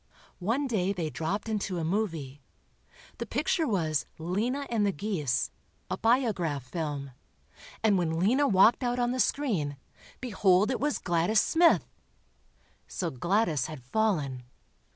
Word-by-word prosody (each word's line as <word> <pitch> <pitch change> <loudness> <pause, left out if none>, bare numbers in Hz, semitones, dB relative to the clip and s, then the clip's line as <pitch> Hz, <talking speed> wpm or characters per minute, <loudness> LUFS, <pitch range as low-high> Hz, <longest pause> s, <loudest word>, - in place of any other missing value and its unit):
One 230 +10 0
day 200 -6 0
they 165 -5 -3
dropped 190 +9 -3
into 200 -4 -2
a 165 - -2
"movie." 160 -7 -2 0.8
The - - -4
picture 325 -4 0
was 160 - 0
"Lena 220 - -1
and 225 -3 +1
the 200 - +2
Geese," 150 - -1 0.4
a - - -1
Biograph 210 - +1
film, 140 0 -4 0.7
and 205 -4 +4
when 165 -2 0
Lena 250 +11 +3
walked 200 +4 +5
out 245 0 0
on 245 0 +1
the 255 - -2
screen, 195 - 0 0.4
behold 205 -3 +2
it 260 - -1
was 295 +2 0
Gladys 175 +5 +2
Smith! 330 - +4 1.0
So - - -3
Gladys 165 - +1
had 155 -5 -9
fallen. 150 - 0
190 Hz, 135 wpm, -29 LUFS, 160-225 Hz, 1.0 s, walked